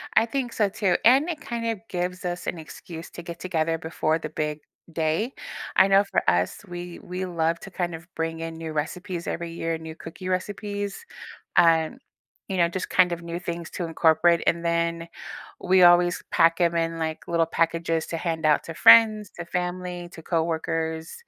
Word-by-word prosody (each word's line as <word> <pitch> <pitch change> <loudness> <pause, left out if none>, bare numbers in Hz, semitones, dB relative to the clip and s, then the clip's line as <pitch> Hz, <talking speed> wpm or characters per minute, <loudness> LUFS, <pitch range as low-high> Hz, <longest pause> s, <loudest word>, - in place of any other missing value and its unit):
I 220 - +6
think 245 0 -3
so 210 -2 +2
too, 195 -1 +1
and 270 +7 +6
it 310 -3 -4
kind 235 -4 -4
of 225 -3 -1
gives 180 0 -3
us 175 0 -4
an - - -2
excuse 165 +1 -9
to - - -8
get 170 0 -8
together 165 -3 0
before 160 0 -1
the 155 - -5
big 150 0 -3 0.3
day. 165 - 0 0.4
I - - +6
know 195 +1 +5
for - - 0
us, 90 +1 +1
we 175 -1 -7
we 180 +1 -5
love 165 -2 0
to 195 - -10
kind 175 -1 -2
of 165 +1 -9
bring 165 0 -2
in 165 0 -5
new 160 -1 -6
recipes 170 +3 -4
every 170 -1 -3
year, 165 0 -2
new 160 0 -9
cookie 170 +3 -8
recipes, 205 - -3 0.5
uh, 165 -2 +5 0.6
you 195 - -3
know, 170 -1 +3
just 185 +2 -4
kind 180 -2 +4
of 170 0 -3
new 170 0 -5
things 170 -2 -5
to 180 - -3
incorporate, 165 +1 +3
and 170 0 +2
then 170 0 0 0.5
we 185 0 +4
always 175 0 +5
pack 165 +1 +4
'em 170 -1 +3
in, 165 0 -1
like, 160 -1 -4
little 170 -1 +2
packages 165 0 0
to - - -4
hand 165 -2 -2
out 150 -1 +4
to 165 - -6
friends, 215 +2 +6
to 175 - -7
family, 180 0 -3
to 165 - -11
coworkers, 160 -1 -2
170 Hz, 190 wpm, -25 LUFS, 165-180 Hz, 0.6 s, I